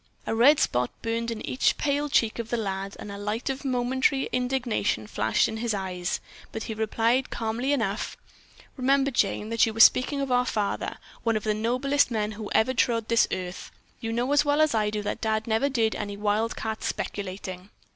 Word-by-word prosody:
A - - -1
red 265 +7 +6
spot 125 0 +1
burned 230 +1 -1
in 230 -2 -5
each 255 - +1
pale 290 0 0
cheek 230 -4 +2
of 230 -1 -4
the 240 - 0
lad 195 -2 -3
and 205 - -8
a 200 - -7
light 215 +5 -2
of 265 +1 -6
momentary 260 +1 +1
indignation 250 - 0
flashed 110 +1 +1
in 220 - -4
his 225 -1 -1
eyes, 185 -2 -3 0.3
but 220 - -5
he 220 - -4
replied 225 +4 +1
calmly 230 +4 -2
enough: 225 -7 -1 0.6
"Remember, 275 +1 +2
Jane, 210 -2 0
that 230 0 +3
you 220 0 -4
are - - -4
speaking 255 +4 +6
of 275 -2 -2
our 250 0 +3
father, 205 -2 -2 0.2
one 230 -2 +1
of 215 - -5
the 215 - +1
noblest 255 +7 +1
men 215 -2 -1
who 215 0 -7
ever 220 +4 +3
trod 235 -2 +1
on 215 - -28
this 230 -1 +4
earth. 180 0 -5 0.3
You 225 - -4
know 245 +4 0
as 290 - +5
well 290 0 +1
as 310 -3 +4
I 215 -2 +2
do 210 0 -3
that - - -3
Dad 220 -1 0
never 225 +5 +1
did 225 -5 +1
any 205 -1 -5
wildcat 220 +1 -1
speculating." 185 -1 -4
225 Hz, 200 wpm, -26 LUFS, 210-255 Hz, 0.6 s, red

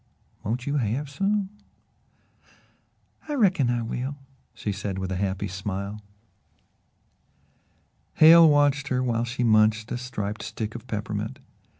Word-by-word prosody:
Won't 120 +5 -3
you 145 +1 0
have 135 +4 -2
some?" 195 +5 0 1.8
"I 295 - -1
reckon 185 - +3
I 120 -1 0
will," 125 +5 -4 0.4
she 105 - -3
said 100 0 -4
with 95 0 -4
a - - -1
happy 95 0 -2
smile. 100 +2 -5 2.1
Hale 165 +1 +8
watched 145 -1 +3
her 130 -2 0
while 120 -1 0
she 125 +1 -3
munched 110 0 +3
a 120 - -2
striped 110 -4 -4
stick 110 0 -5
of 120 +1 -9
peppermint. 105 -3 -4
120 Hz, 125 wpm, -25 LUFS, 105-145 Hz, 2.1 s, Hale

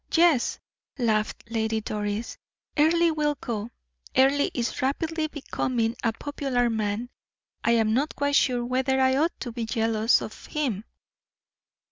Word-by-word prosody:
"Yes," 330 -7 +4 0.4
laughed 220 -4 0
Lady 220 -1 0
Doris, 210 +1 -3 0.4
"Earle 330 +2 +4
will 300 -1 +1
go. 225 -2 -4 0.5
Earle 275 +2 +4
is 235 -2 -2
rapidly 315 +4 0
becoming 250 -6 -2
a 230 - +3
popular 250 -1 -1
man. 220 +2 -2 0.5
I 235 - +3
am 220 -2 +3
not 280 +6 0
quite 285 0 +1
sure 245 -4 +3
whether 260 +2 +1
I 260 0 +4
ought 320 +5 +1
not - - -45
to 245 - -4
be 230 -1 -4
jealous 225 0 +2
of - - -8
him. 250 - -2
245 Hz, 140 wpm, -26 LUFS, 225-285 Hz, 0.5 s, Yes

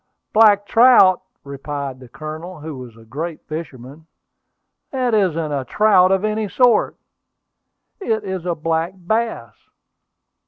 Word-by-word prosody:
"Black 210 -2 +5
trout!" 225 -6 +5 0.2
replied 140 -1 -6
the 130 -2 -14
Colonel, 155 +5 -8
who 155 -1 -7
was 125 -3 -11
a 115 - -17
great 155 +7 -6
fisherman. 155 -1 -8 0.8
"That 255 -3 -1
isn't 165 -7 0
a 140 -2 -2
trout 190 - +3
of 195 +2 +1
any 215 -1 -2
sort! 245 0 +2 1.0
It 220 - -2
is 190 -3 -5
a 175 - 0
black 165 +2 -2
bass." 190 - -2
170 Hz, 125 wpm, -19 LUFS, 145-210 Hz, 1.0 s, Black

